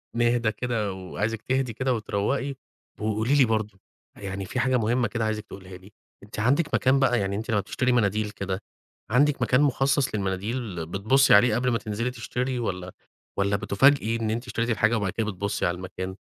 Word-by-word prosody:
نهدى 120 Hz, -1 st, +2 dB
كده 110 Hz, -3 st, -2 dB
وعايزِك 105 Hz, +4 st, -3 dB
تهدي 130 Hz, -2 st, -1 dB
كده 130 Hz, +3 st, 0 dB
وتروّقي، 120 Hz, +6 st, -1 dB, 0.4 s
وقولي 110 Hz, +5 st, 0 dB
لي 135 Hz, -3 st, +6 dB
برضه، 110 Hz, -3 st, -2 dB, 0.4 s
يعني 95 Hz, -1 st, -5 dB
في 125 Hz, -, -3 dB
حاجة 130 Hz, +1 st, +2 dB
مهمّة 120 Hz, +2 st, +1 dB
كده 115 Hz, -2 st, -2 dB
عايزِك 110 Hz, -1 st, -2 dB
تقوليها 95 Hz, -2 st, -10 dB
لي، 95 Hz, +3 st, -17 dB, 0.3 s
أنتِ 105 Hz, +1 st, -8 dB
عندِك 140 Hz, +8 st, +1 dB
مكان 135 Hz, +1 st, +3 dB
بقى، 125 Hz, -4 st, +3 dB
يعني 100 Hz, 0 st, -1 dB
أنتِ 110 Hz, +3 st, -4 dB
لمّا 105 Hz, -, +2 dB
بتشتري 125 Hz, +5 st, -1 dB
مناديل 105 Hz, -2 st, +1 dB
كده، 100 Hz, -1 st, -4 dB, 0.5 s
عندِك 145 Hz, +3 st, +3 dB
مكان 130 Hz, +3 st, +3 dB
مخصص 135 Hz, -2 st, +2 dB
للمناديل 100 Hz, -1 st, -3 dB
بتبُصّي 110 Hz, +11 st, +3 dB
عليه 110 Hz, +2 st, +6 dB
قبل 125 Hz, +1 st, +1 dB
ما 115 Hz, -, +2 dB
تنزلي 115 Hz, +4 st, -3 dB
تشتري 125 Hz, +1 st, -3 dB
والّا 90 Hz, -5 st, -3 dB, 0.5 s
والّا 100 Hz, 0 st, +1 dB
بتُفاجئي 115 Hz, +4 st, +3 dB
إن 115 Hz, -1 st, -2 dB
أنتِ 120 Hz, +3 st, -3 dB
اشتريتِ 115 Hz, -1 st, -2 dB
الحاجة 110 Hz, +1 st, +2 dB
وبعد 100 Hz, -4 st, -1 dB
كده 110 Hz, -, -2 dB
بتبُصّي 100 Hz, -1 st, -2 dB
على 85 Hz, 0 st, 0 dB
المكان؟ 95 Hz, 0 st, -6 dB
110 Hz, 180 wpm, -25 LUFS, 100-125 Hz, 0.5 s, لي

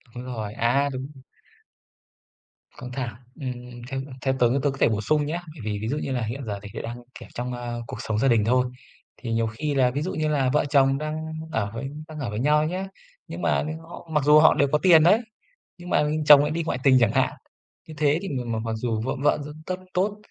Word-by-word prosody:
Đúng 125 Hz, -, -6 dB
rồi 110 Hz, -5 st, -5 dB
à, 125 Hz, +5 st, +2 dB
đúng. 130 Hz, +1 st, -5 dB, 1.7 s
Căng 125 Hz, -1 st, -8 dB
thẳng, 125 Hz, -4 st, -4 dB, 0.3 s
ừm, 130 Hz, -2 st, -2 dB, 0.4 s
ừm, 135 Hz, 0 st, -3 dB
ừm, 140 Hz, -, -11 dB
theo 130 Hz, 0 st, +1 dB
tớ 120 Hz, -, +5 dB, 0.2 s
tớ 145 Hz, -, +3 dB
có 135 Hz, -, -8 dB
thể -, -, +4 dB
bổ 110 Hz, -1 st, -1 dB
sung 150 Hz, +6 st, +1 dB
nhá. 160 Hz, +4 st, -2 dB, 0.2 s
Bởi 150 Hz, -, -11 dB
vì 105 Hz, -1 st, -2 dB
ví 110 Hz, -, -3 dB
dụ 145 Hz, -, -1 dB
như 140 Hz, -, -3 dB
là 125 Hz, -, -1 dB
hiện 120 Hz, +5 st, -4 dB
giờ 100 Hz, -2 st, -4 dB
thì 105 Hz, -, -9 dB
tớ -, -, -5 dB
đang, 120 Hz, +1 st, -6 dB, 0.2 s
kiểu, -, -, -12 dB
trong, 125 Hz, +1 st, -4 dB
ờ, 120 Hz, -1 st, -5 dB
cuộc -, -, -6 dB
sống 110 Hz, -1 st, -2 dB
gia 135 Hz, -, +3 dB
đình 115 Hz, -5 st, +3 dB
thôi, 125 Hz, +2 st, +3 dB, 0.5 s
thì 115 Hz, -2 st, -6 dB
nhiều 115 Hz, 0 st, +1 dB
khi 145 Hz, +7 st, -3 dB
là 130 Hz, -2 st, +3 dB
ví 140 Hz, +3 st, -2 dB
dụ 180 Hz, +5 st, -3 dB
như 155 Hz, -1 st, -1 dB
là 140 Hz, -4 st, +1 dB
vợ 150 Hz, -, +3 dB
chồng 135 Hz, -1 st, +4 dB
đang 155 Hz, +1 st, -3 dB, 0.4 s
ở 100 Hz, -6 st, -1 dB
với 135 Hz, +4 st, -4 dB, 0.2 s
đang 155 Hz, -2 st, -8 dB
ở 130 Hz, -5 st, -3 dB
với 105 Hz, -, -4 dB
nhau 150 Hz, +4 st, +3 dB
nhá, 185 Hz, +3 st, -3 dB, 0.4 s
nhưng -, -, -7 dB
mà -, -, +1 dB, 0.3 s
họ 170 Hz, -, -10 dB
mặc 150 Hz, -3 st, +1 dB
dù 150 Hz, +1 st, +7 dB
họ 155 Hz, -, +7 dB
đều 140 Hz, -, +2 dB
có 150 Hz, -, +4 dB
tiền 170 Hz, -4 st, +7 dB
đấy, 205 Hz, +8 st, +5 dB, 0.6 s
nhưng 175 Hz, 0 st, -10 dB
mà -, -, +3 dB, 0.2 s
chồng 145 Hz, -1 st, +9 dB
lại 150 Hz, +1 st, 0 dB
đi 165 Hz, +1 st, -1 dB
ngoại 160 Hz, -, -2 dB
tình 135 Hz, -2 st, +6 dB
chẳng 115 Hz, -3 st, +3 dB
hạn. -, -, +1 dB, 0.5 s
Như 160 Hz, -, -9 dB
thế 150 Hz, +1 st, +2 dB
thì 195 Hz, -, -5 dB
m 120 Hz, -5 st, -3 dB
mặc 115 Hz, -1 st, -2 dB
dù 110 Hz, -1 st, -2 dB
vợ 125 Hz, -, -2 dB
vợ 145 Hz, -, +4 dB, 0.3 s
rất 185 Hz, -, -2 dB, 0.2 s
tốt 200 Hz, +3 st, 0 dB
135 Hz, 245 wpm, -25 LUFS, 120-150 Hz, 1.7 s, chồng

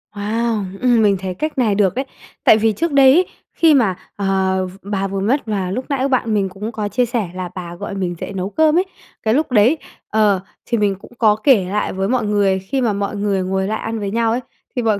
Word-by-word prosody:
Wow, 215 Hz, +1 st, -1 dB, 0.2 s
ừm, 245 Hz, -3 st, +4 dB
mình 200 Hz, -2 st, +3 dB
thấy 190 Hz, -1 st, -4 dB
cách 305 Hz, +11 st, -4 dB
này 225 Hz, -6 st, +2 dB
được 195 Hz, -3 st, +2 dB
đấy. 265 Hz, -, -1 dB, 0.4 s
Tại 215 Hz, -, +6 dB
vì 220 Hz, 0 st, +2 dB
trước 330 Hz, +8 st, -1 dB
đây 270 Hz, -2 st, +6 dB
ấy, 360 Hz, +5 st, +4 dB, 0.3 s
khi 325 Hz, -2 st, +4 dB
mà, 225 Hz, -10 st, +3 dB, 0.2 s
ờ, 190 Hz, -1 st, 0 dB
v 185 Hz, 0 st, -9 dB
bà 195 Hz, -1 st, -2 dB
vừa 195 Hz, 0 st, -3 dB
mất, 240 Hz, +9 st, 0 dB
và 195 Hz, -4 st, -2 dB
lúc 255 Hz, +6 st, -3 dB
nãy 275 Hz, -1 st, 0 dB
bạn 250 Hz, -4 st, 0 dB
mình 200 Hz, -2 st, +1 dB
cũng 200 Hz, +4 st, -6 dB
có 215 Hz, -2 st, -3 dB
chia 250 Hz, +4 st, +1 dB
sẻ 230 Hz, -5 st, -2 dB
là 185 Hz, -1 st, -4 dB
bà 175 Hz, -2 st, -6 dB
gọi 200 Hz, +2 st, -6 dB
mình 180 Hz, -3 st, -2 dB
dậy -, -, -6 dB
nấu 190 Hz, 0 st, -3 dB
cơm 315 Hz, +6 st, +3 dB
ấy, 365 Hz, -, +3 dB, 0.4 s
cái 220 Hz, -, +2 dB
lúc 290 Hz, +2 st, 0 dB
đấy, 240 Hz, +7 st, +4 dB, 0.3 s
ờ, 210 Hz, -3 st, +3 dB, 0.3 s
thì 235 Hz, -, 0 dB
mình 205 Hz, -2 st, +1 dB
cũng -, -, -15 dB
có 215 Hz, -3 st, +4 dB
kể 220 Hz, -3 st, +3 dB
lại 210 Hz, +2 st, -1 dB
với 190 Hz, +1 st, -1 dB
mọi 245 Hz, -3 st, +1 dB
người, 200 Hz, -2 st, +2 dB
khi 195 Hz, +8 st, -2 dB
mà 230 Hz, -4 st, +1 dB
mọi 200 Hz, +1 st, -2 dB
người 200 Hz, -2 st, 0 dB
ngồi 190 Hz, +1 st, -1 dB
lại 220 Hz, +1 st, -2 dB
ăn 225 Hz, 0 st, -4 dB
với 200 Hz, -1 st, -3 dB
nhau 230 Hz, +1 st, +1 dB
ấy, 235 Hz, -, 0 dB, 0.4 s
thì 250 Hz, -, 0 dB
mọi 220 Hz, -3 st, +1 dB
210 Hz, 250 wpm, -19 LUFS, 195-240 Hz, 0.4 s, Tại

